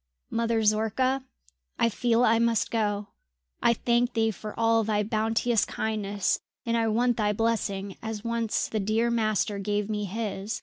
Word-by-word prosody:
"Mother 230 -1 +1
Zorka, 225 +5 +1 0.5
I - - +3
feel 235 +2 +2
I 225 -1 +4
must 230 -2 +1
go. 210 -2 -1 0.5
I 235 - +4
thank 240 +2 +1
thee 225 -1 +2
for 215 +2 -8
all 225 0 +3
thy 210 -1 +1
bounteous 225 +2 +1
kindness, 205 -3 -1 0.3
and 230 -1 0
I 230 -1 +2
want 240 +2 +2
thy 210 -2 +1
blessing 200 -3 -1
as 220 -1 -5
once 230 -1 -1
the 220 - -2
dear 220 +4 +1
master 215 -3 0
gave 205 +1 -1
me 210 -1 -2
his!" 210 +1 -4
220 Hz, 160 wpm, -27 LUFS, 210-230 Hz, 0.5 s, I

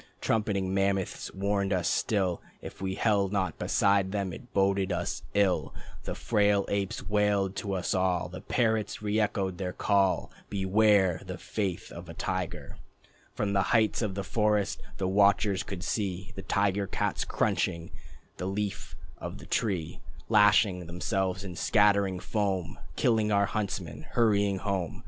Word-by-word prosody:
Trumpeting 100 -4 0
mammoths 95 -1 0
warning 100 0 -1
us 90 -3 +1
still 95 -5 0 0.2
If - - -10
we 95 0 -2
held 100 -3 +2
not 95 -5 -1
beside 100 -1 +2
them 100 -3 -2
it 125 +5 -11
boded 95 -1 +2
us - - -2
ill. 100 -3 +2 0.3
The - - -3
frail 105 -3 +2
apes 100 0 -2
wailed 105 -2 +1
to 100 - -3
us 90 -2 -1
all, 90 -2 +1
The 90 +1 -9
parrots 110 -1 0
reëchoed 105 -3 0
the 90 0 -3
call: 95 -2 +1 0.2
"Beware 100 -2 +3
of - - -14
the - - -5
faith 95 -5 -3
of - - -9
a - - -8
tiger." - - -4 0.6
From 100 -1 -1
the 100 - +3 0.2
heights 110 +1 +1
of 105 -4 -2
the 100 - -2
forest 105 0 +1 0.2
the 95 - -1
watchers 100 0 +3
could 95 -2 -6
see 95 -3 -2
The 95 - -5
tiger 100 0 0
cats - - -1
crunching 85 0 -1 0.5
the 90 - -3
Leaf 100 0 -3 0.2
of - - -6
the - - -11
Tree 90 -7 -1 0.3
Lashing 105 -4 +4
themselves, 95 +2 -1
and 90 -3 -6
scattering 100 -1 +3
foam, 95 -5 -2 0.2
Killing 110 -3 +2
our 100 0 +4
huntsmen, 90 -7 -4
hurrying 100 -4 +3
home. 95 -3 -2
100 Hz, 150 wpm, -29 LUFS, 95-105 Hz, 0.6 s, Lashing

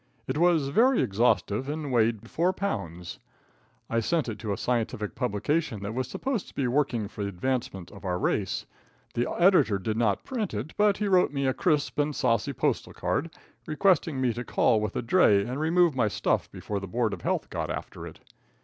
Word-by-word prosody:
It 130 +5 -2
was 165 -5 +3
very 240 - +4
exhaustive 110 +3 +1
and 150 -2 -3
weighed 115 -2 +1
four 175 +8 +1
pounds. 90 - -4 0.7
I 115 - 0
sent 155 +6 0
it 110 -2 -5
to 110 -3 -3
a 100 - -1
scientific 115 -4 -2
publication 115 +1 -1
that 100 +2 -4
was 130 +1 -2
supposed 260 -7 -3
to - - -15
be 135 - 0
working 120 -5 0
for 105 - -8
the 100 - -2
advancement 100 -3 -3
of 100 - -13
our 90 -2 -1
race. 95 +1 -1 0.5
The 120 +1 -1
editor 170 - +4
did 105 +3 -3
not 110 -4 +1
print 220 - -3
it, 120 +10 -5
but 205 -1 +3
he 210 - -1
wrote 185 -5 +4
me 140 -1 -1
a 130 - +2
crisp 150 -2 0
and 145 0 +1
saucy 115 -7 +1
postal - - -1
card, - - -1 0.4
requesting 160 -3 +2
me 125 -3 +1
to 120 +2 -5
call 110 -2 +2
with 105 -2 -3
a - - -1
dray 110 - +4
and 125 +3 -4
remove 165 0 +3
my 120 -4 +2
stuff - - -1
before 105 -1 -4
the 95 - -7
board 115 +2 0
of - - -6
health - - -2
got - - -3
after - - -6
it. - - -13
125 Hz, 200 wpm, -27 LUFS, 105-155 Hz, 0.7 s, very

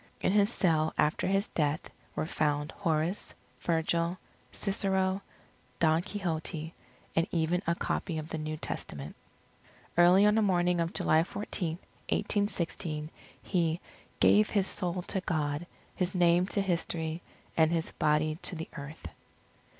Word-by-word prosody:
In - - +1
his 205 +2 +4
cell 160 -7 +2
after 150 - +2
his 195 +2 +2
death, 150 -1 -1 0.2
were - - -1
found 150 -1 0
Horace, 165 0 -1 0.2
Virgil, 170 +1 +1 0.3
Cicero, 195 -1 0 0.6
Don 160 0 +3
Quixote, 165 -4 -3 0.4
and 165 +1 +2
even 170 +1 +1
a 170 - +2
copy 170 -1 -2
of 155 0 -5
the 160 - -3
New 155 0 -3
Testament. 75 - -5 0.8
Early 180 +3 +7
on 210 - +5
the 220 - +3
morning 180 -3 +2
of 165 0 0
July 155 - +3
14, 170 -2 -3 0.3
1816, 170 -7 -1 0.3
he 170 -2 +1 0.4
"gave 210 +1 +5
his 200 -3 +2
soul 180 -1 0
to 190 - -2
God, 155 -2 -1 0.3
his 180 0 -1
name 175 0 +4
to 200 - 0
history, 170 -3 -1 0.3
and 160 0 +4
his 165 -1 -1
body 155 +1 +1
to 185 - -3
the 160 0 -6
earth." 140 - -7
170 Hz, 135 wpm, -30 LUFS, 155-185 Hz, 0.8 s, Early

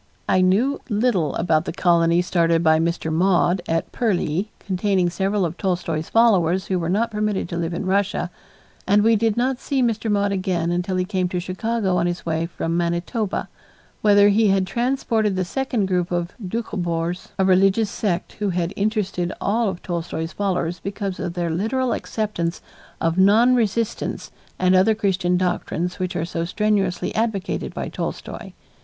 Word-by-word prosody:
I 185 - +3
knew 215 +10 +2
little 210 - +1
about 165 -2 +1
the - - -3
colony 170 0 +3
started 170 -2 +2
by 160 -1 +4
Mr. 165 -1 -1
Maude 180 +1 +2
at 165 0 -1
Purleigh 190 - 0
containing 185 -2 0
several 195 +2 0
of 170 +1 -4
Tolstoy's 170 -4 -2
followers 190 -6 +3
who 185 -2 -1
were 165 -1 -2
not 225 +5 +1
permitted 210 -3 -1
to 170 - -4
live 170 0 -2
in 175 - -3
Russia, 195 -1 0 0.6
and 205 +2 +4
we 225 +1 +5
did 220 0 +1
not 255 +1 0
see 270 -2 0
Mr. 225 -1 0
Maude 200 -1 +1
again 185 -3 -1
until 180 +2 -1
he 185 0 0
came 185 -2 -1
to 180 - -2
Chicago 190 +1 -1
on 175 0 +1
his 175 0 -4
way 165 0 -1
from 165 0 -3
Manitoba, 175 +5 -1 0.5
whither 205 -1 +6
he 215 +2 +4
had 195 -1 +2
transported 230 -2 0
the 185 -1 0
second 250 0 -1
group 180 -2 0
of 175 0 -1
Dukhobors, 180 -4 -3
a 190 - +2
religious 195 +3 +3
sect 180 -4 -2
who 205 -1 0
had 175 0 -1
interested 200 -4 -1
all 220 +1 +1
of 185 -2 -7
Tolstoy's 165 -2 -3
followers 180 -4 -1
because 195 0 -4
of 175 0 -4
their 170 -2 -1
literal 235 +8 0
acceptance 190 -6 -3 0.4
of 165 +2 0
non 220 +6 +5
resistance 230 -1 -1 0.3
and 185 0 +3
other 190 +4 +4
Christian 190 -4 +1
doctrines 180 0 -2
which 185 -1 -2
are 165 -2 -1
so 165 -1 -3
strenuously 195 -1 0
advocated 220 -4 -2
by - - -3
Tolstoy. - - -6
185 Hz, 170 wpm, -22 LUFS, 175-210 Hz, 0.6 s, whither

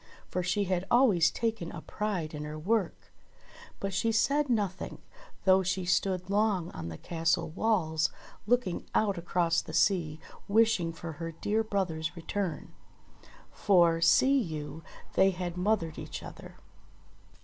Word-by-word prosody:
For 180 - -1
she 185 +3 0
had 185 -1 -1
always 210 -10 +5
taken 225 -6 -2
a 165 - -7
pride 190 -7 -3
in 150 0 -5
her 150 +1 -6
work. 195 +3 -1 0.7
But 195 0 -3
she 210 +4 +1
said 280 +6 +2
nothing, 205 -6 -2 0.4
though 190 0 +6
she 185 0 -1
stood 185 0 0
long 200 -4 +1
on 85 -1 -6
the 80 - -7
castle 165 0 0
walls 170 -5 +1 0.4
looking 240 -6 0
out 200 -4 +2
across 170 -1 +1
the - - -10
sea 165 -6 +2 0.3
wish 220 +1 +4
ing 165 -1 -2
for 165 0 -7
her 165 +2 -6
dear 210 +7 -1
brother's 175 -6 -2
return; 175 +1 -4 0.8
for, 170 -4 +3
see 265 +10 +5
you, 155 - -5 0.3
they 190 - +5
had 180 -2 -4
mothered 180 -4 0
each - - -7
other. - - -11
180 Hz, 145 wpm, -30 LUFS, 165-210 Hz, 0.8 s, though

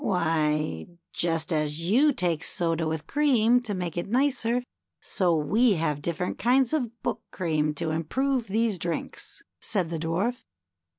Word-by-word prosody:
Why, 155 - 0 0.3
just 165 -1 0
as 155 +2 -1
you 270 +10 +5
take 175 - 0
soda 165 -2 0
with 155 -1 -3
cream, 245 -5 +3
to 215 -5 -4
make 175 -3 -4
it 175 - -3
nicer, 250 -1 +1 0.4
so 180 -3 +1
we 210 - +3
have 155 -4 -1
different 170 +4 -3
kinds 255 +4 +3
of 240 -6 -2
Book - - -2
cream 155 -4 -1
to 155 - -2
improve 245 - -1
these 215 -1 0
drinks," 170 0 -4 0.2
said 185 -6 0
the 165 - -2
Dwarf. 195 +10 -1
180 Hz, 150 wpm, -26 LUFS, 160-235 Hz, 0.4 s, you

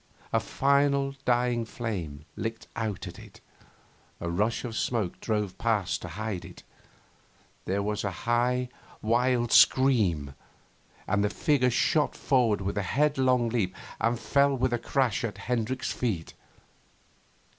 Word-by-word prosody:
A - - +4
final 140 0 +2
dying 120 -1 +2
flame 90 -11 -5
licked 115 +1 -4
out 110 -4 -3
at - - -9
it; - - -14 0.8
a 85 0 -3
rush 105 +8 0
of 115 -2 -5
smoke 110 -6 -1
drove 105 -4 -1
past 105 -6 0
to - - -6
hide 100 +2 -4
it; - - -12 1.0
there 100 +2 0
was 105 0 -2
a 100 - 0 0.2
high, 125 +1 +1 0.3
wild 120 +1 +2
scream 100 - +4 0.7
and 100 +1 +1
the 105 - +2
figure 130 +2 +2
shot 145 +5 +2
forward 120 -7 +2
with 100 +1 -2
a 95 - -3
headlong 130 -5 +3
leap 110 -6 -1 0.2
and 115 +1 +1
fell 140 +3 +2
with 130 0 +1
a 120 - 0
crash 125 -2 0
at 115 -3 -3
Hendricks' 125 +2 -2
feet. 100 -10 -2
115 Hz, 135 wpm, -28 LUFS, 100-125 Hz, 1.0 s, A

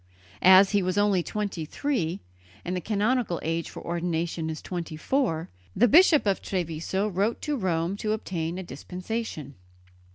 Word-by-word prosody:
As 190 +1 +7
he 205 -1 +3
was 185 +1 -1
only 205 -3 +3
twenty 200 -3 -3
three, 185 - -2 0.4
and 180 - -2
the 180 - -2
canonical 215 0 0
age 165 +1 -2
for - - -10
ordination 170 -1 -2
is 155 - -4
twenty 170 -3 -5
four, 165 - -1 0.2
the 245 - +5
Bishop 320 - +6
of 200 -2 +1
Treviso 180 +2 -2
wrote 205 +3 0
to 300 -1 -1
Rome 180 -5 -1
to 215 +1 -2
obtain 175 -5 -3
a 190 - -4
dispensation. 180 - -5
185 Hz, 155 wpm, -26 LUFS, 165-210 Hz, 0.4 s, As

